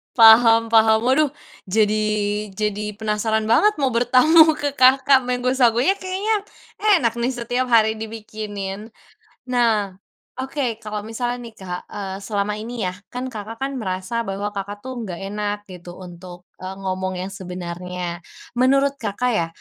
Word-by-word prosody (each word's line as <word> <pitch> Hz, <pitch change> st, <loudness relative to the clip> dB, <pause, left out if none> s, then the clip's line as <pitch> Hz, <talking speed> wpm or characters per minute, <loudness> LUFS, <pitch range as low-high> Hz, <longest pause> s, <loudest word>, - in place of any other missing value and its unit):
Paham 225 Hz, 0 st, +7 dB
paham, 220 Hz, 0 st, +5 dB
waduh 280 Hz, +4 st, +3 dB, 0.4 s
jadi, 215 Hz, +2 st, +2 dB, 0.6 s
jadi 210 Hz, 0 st, -2 dB
penasaran 220 Hz, 0 st, -1 dB
banget 420 Hz, -, +4 dB
mau 270 Hz, -3 st, 0 dB
bertamu 300 Hz, +7 st, +5 dB
ke 290 Hz, -1 st, -2 dB
Kakak 270 Hz, 0 st, +5 dB
mango 250 Hz, 0 st, 0 dB
sago-nya 245 Hz, +3 st, +3 dB
kayaknya, 395 Hz, +3 st, -1 dB, 0.6 s
enak 230 Hz, +1 st, 0 dB
nih 245 Hz, +2 st, -1 dB
setiap 245 Hz, +2 st, -2 dB
hari 220 Hz, -2 st, +3 dB
dibikinin, 215 Hz, -2 st, -6 dB, 0.6 s
nah, 230 Hz, -5 st, +1 dB, 0.5 s
oke 260 Hz, -4 st, -3 dB
kalau 210 Hz, -1 st, -5 dB
misalnya 240 Hz, +2 st, -3 dB
nih 230 Hz, -, -9 dB
Kak, 180 Hz, -1 st, -6 dB
eee, 195 Hz, -2 st, -6 dB
selama 205 Hz, 0 st, -2 dB
ini 220 Hz, -2 st, -4 dB
ya 180 Hz, -, -4 dB, 0.2 s
kan 250 Hz, +1 st, -4 dB
Kakak 225 Hz, -1 st, -8 dB
kan 275 Hz, +1 st, -3 dB
merasa 215 Hz, +1 st, -3 dB
bahwa 200 Hz, 0 st, -4 dB
Kakak 200 Hz, +1 st, -5 dB
tuh 255 Hz, 0 st, -6 dB
nggak 180 Hz, -4 st, -6 dB
enak 205 Hz, +1 st, -3 dB
gitu 180 Hz, -1 st, -11 dB
untuk, 175 Hz, 0 st, -11 dB, 0.2 s
eee, 190 Hz, +1 st, -5 dB
ngomong 185 Hz, -1 st, -3 dB
yang 185 Hz, -, -4 dB
sebenarnya, 180 Hz, -2 st, -6 dB, 0.3 s
menurut 275 Hz, +2 st, +3 dB
Kakak 240 Hz, +5 st, -1 dB
ya 165 Hz, -3 st, 0 dB
220 Hz, 145 wpm, -21 LUFS, 195-250 Hz, 0.6 s, Paham